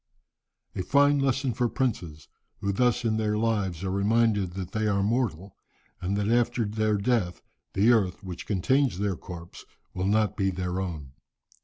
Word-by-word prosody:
"A - - -1
fine 145 +6 +4
lesson 135 -1 +1
for 120 +2 0
princes, 95 - -3 0.3
who 100 - -1
thus 120 +3 +1
in 110 -1 +1
their 105 -1 0
lives 100 -6 0
are 95 - -1
reminded 105 -1 +2
that 95 -1 -5
they 110 0 0
are 100 -1 +1
mortal, 100 -5 -1 0.5
and 95 +3 -1
that 105 0 0
after 120 0 +2
their 110 0 0
death 100 -4 0 0.3
the 105 +5 +4
earth 100 -5 +1
which 90 -2 -7
contains 120 +4 +1
their 100 -1 -1
corpse 85 0 -10 0.3
will 90 +1 -1
not 105 0 +2
be 95 -1 +1
their 90 0 -3
own. 80 -8 -5
105 Hz, 165 wpm, -27 LUFS, 95-115 Hz, 0.5 s, fine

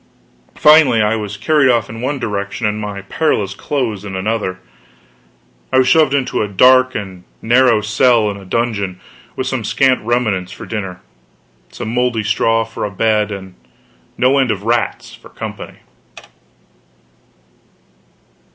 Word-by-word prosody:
Finally 150 -6 +5
I 105 +1 +2
was 105 -1 -5
carried 140 +5 +2
off 120 -2 +2
in 115 +1 -8
one 140 +3 -2
direction, 105 -2 -4
and 105 0 -1
my 100 -2 -6
perilous 100 -4 -1
clothes 115 -6 -3
in 100 -2 -6
another. 95 -1 -2 1.1
I - - +2
was 130 -1 +4
shoved 150 -2 +4
into 135 -2 -1
a 105 - -1
dark 130 +6 +4
and 95 -4 -6 0.2
narrow 120 -1 +3
cell 110 +2 +2
in - - -7
a 100 - -12
dungeon, 100 -3 -2 0.4
with - - -3
some - - -2
scant 130 -1 +2
remnants 110 -6 -1
for - - -9
dinner, 95 -5 -5 0.7
some 110 - -6
moldy 125 -3 0
straw 115 +1 +1
for 115 - -7
a 105 - -2
bed, 105 +1 0
and 95 -2 -8 0.6
no 130 +2 +3
end 130 -2 +1
of 100 -2 -2
rats 120 +1 -1
for - - -15
company. - - -8
110 Hz, 145 wpm, -16 LUFS, 100-125 Hz, 1.1 s, Finally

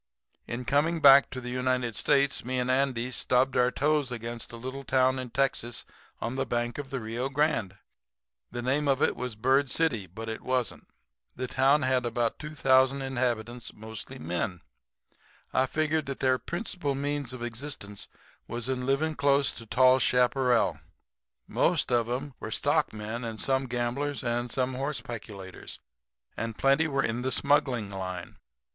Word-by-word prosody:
"In 120 +2 -4
coming 150 +7 +2
back 140 -2 +8
to 130 - -6
the 125 -1 -6
United 125 -2 0
States 140 +2 +2
me 130 +1 -2
and 125 0 +1
Andy 130 -2 +1
stubbed 130 +1 +1
our 125 0 +4
toes 145 0 +1
against 115 -1 -5
a - - -8
little 130 +3 -6
town 130 0 +2
in 130 -1 -5
Texas 120 -2 -1 0.3
on 120 +2 -3
the - - 0
bank 120 +2 -1
of 140 -2 -6
the 135 - -3
Rio 120 +4 -3
Grande. 135 - 0 0.7
The 120 - -5
name 140 +4 +1
of 135 0 +2
it - - +2
was 125 -2 -4
Bird 130 +5 +2
City; 125 -10 +1
but 110 +7 -8
it 110 0 -4
wasn't. 130 -2 -1 0.5
The 130 - -3
town 135 +3 +3
had 130 -1 +2
about 120 -1 -1
2,000 135 -2 +3
inhabitants, 120 -3 -2
mostly 110 +1 -7
men. 85 +2 -3 0.9
I 130 0 +3
figured 155 +2 0
out 135 - -3
that - - -30
their 130 -1 +2
principal 175 -6 -3
means 140 -1 -2
of 130 -2 -7
existence 115 -4 -6 0.4
was 120 +1 -3
in 130 -1 -2
living 155 +4 +1
close 140 -1 +3
to 115 - -9
tall 130 +3 +5
chaparral. 125 -1 +3 0.7
Some - - -7 0.3
of 120 -1 +2
'em 135 +3 -3
were - - -5
stockmen 110 +3 -1
and 115 -2 -5
some 135 0 +1
gamblers 125 +4 -2
and 120 0 -1
some 130 +2 0
horse 140 +3 -1
peculators 100 -5 -7 0.6
and 115 -1 -4
plenty 140 +4 +3
were 135 -2 0
in 115 +2 -1
the 130 +1 -1
smuggling 125 -6 +2
line. 95 -2 -6
130 Hz, 165 wpm, -28 LUFS, 120-135 Hz, 0.9 s, back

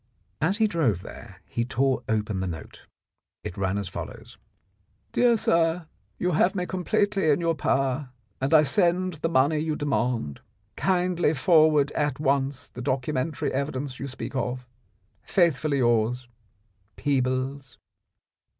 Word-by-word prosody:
As 180 +7 +2
he 220 - +3
drove 145 - +1
there - - -11
he 115 - -2
tore 130 +2 0
open 105 -2 0
the 95 - -2
note. 80 -2 -8 0.6
It 90 - -6
ran 95 0 -1
as 100 -2 -2
follows: - - -8 0.7
"Dear 240 -1 +4
Sir, 165 -3 +1 0.2
— - - -42
You 180 - 0
have 175 +4 +2
me 180 -2 -1
completely 195 -1 0
in 145 - +3
your 170 -1 +1
power, 135 -1 0 0.3
and 135 - 0
I 155 -2 +7
send 180 0 +1
the 165 - 0
money 150 +1 +3
you 155 0 -1
demand. 120 - -1 0.4
Kindly 180 -4 +1
forward 155 -1 +4
me - - -8
at 145 -2 -1
once 135 -2 0
the 125 - -8
documentary 130 +3 -1
evidence 140 -1 -3
you 140 - -4
speak 130 +1 -7
of. 125 -1 -2 0.6
Faithfully 155 -5 +1
yours, 120 0 +1 0.7
Peebles." 130 -1 -1
140 Hz, 140 wpm, -26 LUFS, 130-165 Hz, 0.7 s, I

